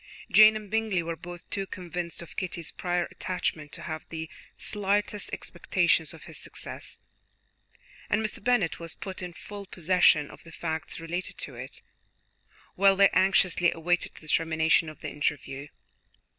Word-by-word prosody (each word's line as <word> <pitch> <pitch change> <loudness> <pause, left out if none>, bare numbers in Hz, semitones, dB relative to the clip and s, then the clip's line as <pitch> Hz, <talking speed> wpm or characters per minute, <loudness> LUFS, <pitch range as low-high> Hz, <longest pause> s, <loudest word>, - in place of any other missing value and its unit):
Jane 215 0 +9
and 215 -1 -5
Bingley 220 -5 +1
were 165 0 -3
both 175 +1 -9
too 195 -1 -2
convinced 175 -2 -5
of 170 - -13
Kitty's 170 -3 -3
prior 175 -1 0
attachment 160 -5 -2
to - - -7
have 155 -1 -4
the 160 0 -5 0.3
slightest 205 0 0
expectation - - +1
of - - -12
his - - -9
success, - - -9 1.1
and 220 +2 +2
Mr. 210 - -5
Bennet 230 -9 +2
was 165 -1 -4
put 190 -1 -6
in 180 -1 -4
full 200 +3 -9
possession 175 -4 +4
of - - -14
the 165 - -13
facts 160 -1 -3
relating 170 +3 -4
to 140 - -6
it, 130 +2 -9 0.9
while 195 +1 +5
they 195 0 +7
anxiously 185 -2 +4
awaited 175 +2 0
the 155 - -13
termination 160 +1 +3
of 155 - -12
the - - -3
interview. 140 -1 -2
175 Hz, 155 wpm, -28 LUFS, 160-195 Hz, 1.1 s, Jane